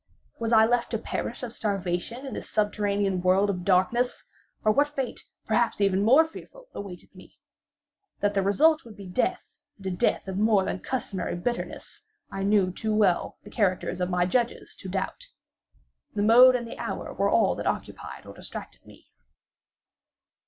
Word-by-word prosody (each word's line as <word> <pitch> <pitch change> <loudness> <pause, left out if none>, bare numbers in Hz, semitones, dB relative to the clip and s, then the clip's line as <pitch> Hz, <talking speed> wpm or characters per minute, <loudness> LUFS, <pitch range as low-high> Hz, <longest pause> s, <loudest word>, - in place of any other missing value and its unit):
Was 230 0 -2
I 220 -1 +7
left 240 +1 +1
to - - -1
perish - - -4
of 235 -2 -5
starvation 200 +4 -2
in 265 - -6
this - - -6
subterranean 205 -3 0
world 190 +3 +3
of 180 -2 -5
darkness; 200 +7 +1 0.4
or 215 - +4
what 285 +6 +3
fate, 270 -4 -4 0.2
perhaps 235 0 +1
even 195 -1 +2
more 265 +10 +6
fearful, - - -12
awaited 185 -3 -9
me? - - -16 0.8
That 205 0 +1
the 195 - +2
result 305 +12 +3
would 220 -3 -13
be 200 - -9
death, 180 +7 -2 0.2
and 195 - -15
a 190 - -1
death 180 - 0
of 190 0 -3
more 210 -3 +3
than - - -3
customary 200 -9 -3
bitterness, 240 - -4 0.3
I 195 - -4
knew 195 -2 +3
too 215 +3 -2
well 200 -5 +2
the 205 - -12
character 195 -6 +1
of 180 0 -2
my 180 -1 +2
judges 235 +6 -1
to 190 - -7
doubt. 190 +1 -3 0.9
The 205 - +1
mode 250 +4 +8
and 240 -1 -2
the 230 - -9
hour - - -4
were - - +1
all - - +3
that - - -4
occupied - - -4
or - - -10
distracted - - -9
me. - - -17
205 Hz, 175 wpm, -26 LUFS, 190-240 Hz, 0.9 s, mode